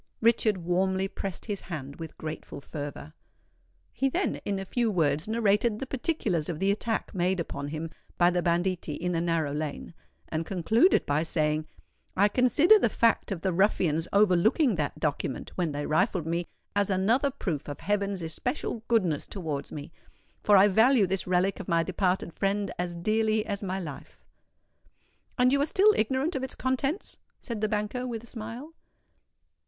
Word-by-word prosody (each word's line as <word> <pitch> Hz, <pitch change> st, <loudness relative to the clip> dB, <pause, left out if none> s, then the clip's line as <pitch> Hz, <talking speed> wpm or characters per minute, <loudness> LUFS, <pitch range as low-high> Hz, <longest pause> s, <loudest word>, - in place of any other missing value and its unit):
Richard 225 Hz, -3 st, +3 dB
warmly 190 Hz, +2 st, 0 dB
pressed 195 Hz, -1 st, -6 dB
his 205 Hz, -3 st, -3 dB
hand 140 Hz, -5 st, -7 dB
with 165 Hz, -2 st, -8 dB
grateful 155 Hz, -2 st, -6 dB
fervour. 145 Hz, -, -7 dB, 0.8 s
He 270 Hz, +3 st, +1 dB
then 360 Hz, +8 st, -1 dB
in 200 Hz, -1 st, -1 dB
a 195 Hz, -, -4 dB
few 235 Hz, +3 st, 0 dB
words 155 Hz, -4 st, +1 dB
narrated 220 Hz, 0 st, +2 dB
the 270 Hz, -, -4 dB
particulars 240 Hz, -, -1 dB
of 170 Hz, -, -3 dB
the 195 Hz, +4 st, +2 dB
attack 220 Hz, +2 st, -2 dB
made 185 Hz, 0 st, 0 dB
upon 140 Hz, -4 st, -4 dB
him 160 Hz, +2 st, -5 dB, 0.3 s
by 175 Hz, 0 st, +5 dB
the 180 Hz, 0 st, +1 dB
banditti 175 Hz, -2 st, 0 dB
in 180 Hz, +3 st, -2 dB
the 165 Hz, -1 st, 0 dB
narrow 165 Hz, -4 st, 0 dB
lane, 150 Hz, +2 st, -4 dB, 0.3 s
and 160 Hz, +1 st, -2 dB
concluded 220 Hz, -, +3 dB
by 145 Hz, +2 st, +1 dB
saying, 155 Hz, -1 st, 0 dB, 0.5 s
"I 205 Hz, +2 st, +5 dB
consider 285 Hz, -, +5 dB
the 235 Hz, -, +2 dB
fact 230 Hz, 0 st, +2 dB
of 180 Hz, -4 st, -3 dB
the 190 Hz, -, 0 dB
ruffians 170 Hz, -4 st, +2 dB
overlooking 210 Hz, -, +4 dB
that 150 Hz, -5 st, -2 dB
document 145 Hz, -3 st, -2 dB
when 175 Hz, -4 st, -1 dB
they 145 Hz, 0 st, -3 dB
rifled 180 Hz, +1 st, +1 dB
me, 170 Hz, +1 st, -2 dB, 0.3 s
as 205 Hz, -1 st, +2 dB
another 220 Hz, +9 st, +2 dB
proof 180 Hz, -, -4 dB
of 145 Hz, -1 st, -7 dB
heaven's 200 Hz, -2 st, -1 dB
especial 165 Hz, -, -3 dB
goodness 185 Hz, -11 st, +1 dB
towards 155 Hz, -8 st, -4 dB
me; 145 Hz, +1 st, -7 dB, 0.5 s
for 205 Hz, -1 st, +5 dB
I 195 Hz, +2 st, +7 dB
value 220 Hz, +3 st, +5 dB
this 190 Hz, +1 st, -2 dB
relic 185 Hz, +2 st, +1 dB
of 200 Hz, -, -7 dB
my 170 Hz, -1 st, +2 dB
departed 185 Hz, -1 st, -1 dB
friend 200 Hz, 0 st, -1 dB
as 175 Hz, -1 st, -2 dB
dearly 215 Hz, +4 st, +1 dB
as 200 Hz, -2 st, -3 dB
my 190 Hz, -1 st, -2 dB
life." 150 Hz, -7 st, -9 dB, 1.1 s
"And 250 Hz, 0 st, +4 dB
you 280 Hz, -, +3 dB
are 290 Hz, -, +1 dB
still 410 Hz, +6 st, +5 dB
ignorant 265 Hz, +9 st, 0 dB
of 265 Hz, -, -1 dB
its 265 Hz, -, -5 dB
contents?" 270 Hz, +7 st, -2 dB, 0.2 s
said 230 Hz, -4 st, -5 dB
the 215 Hz, -, +1 dB
banker, 215 Hz, +4 st, -2 dB
with 230 Hz, -2 st, -5 dB
a -, -, -11 dB
smile. 235 Hz, +7 st, -8 dB
190 Hz, 170 wpm, -28 LUFS, 165-225 Hz, 1.1 s, I